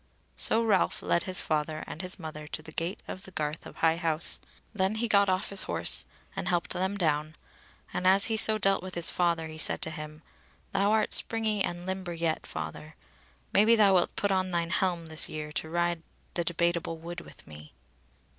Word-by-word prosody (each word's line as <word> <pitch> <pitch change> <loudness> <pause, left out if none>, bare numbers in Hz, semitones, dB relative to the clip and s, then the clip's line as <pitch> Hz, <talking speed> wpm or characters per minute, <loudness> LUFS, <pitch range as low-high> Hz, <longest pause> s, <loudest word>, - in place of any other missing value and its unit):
So 225 +1 +4
Ralph 205 -5 +1
led 170 - +1
his 185 -1 0
father 155 0 -2
and 160 - -7
his 185 0 -1
mother 155 -3 -8
to 155 - -5
the 160 - -10
gate 170 +6 -3
of 185 - -7
the 190 - -12
garth 155 -3 -4
of - - -13
High 165 0 +2
House; 165 -1 +1 0.3
then 195 0 0
he 235 +2 -1
got 200 -2 +4
off 185 0 0
his 200 - +5
horse - - +2 0.3
and - - -4
helped 175 -2 -1
them 190 +2 -2
down, 155 -3 -1 0.6
and 185 - 0
as 195 +2 +7
he 225 - +2
so 220 0 +6
dealt 195 -2 +2
with 185 0 -7
his 170 -1 +3
father, 170 -2 0
he 155 0 -9
said - - +4
to 160 - -1
him: 155 -1 -9 0.5
"Thou 200 +1 +1
art 220 -1 +2
springy 220 -3 +3
and 175 0 -4
limber 190 -2 -4
yet, 165 -1 -2
father; 155 +1 -7 0.6
maybe 215 +3 +5
thou 205 -3 +5
wilt 180 -2 +2
put 205 - 0
on 185 -1 +1
thine 170 -1 -1
helm 175 -2 0
this 160 -1 -2
year 150 -1 -6
to 160 +1 -4
ride 175 0 -1 0.3
the 175 - +1
Debateable 170 0 -1
Wood 170 +2 -7
with - - -15
me." 75 0 -13
175 Hz, 200 wpm, -28 LUFS, 160-195 Hz, 0.6 s, as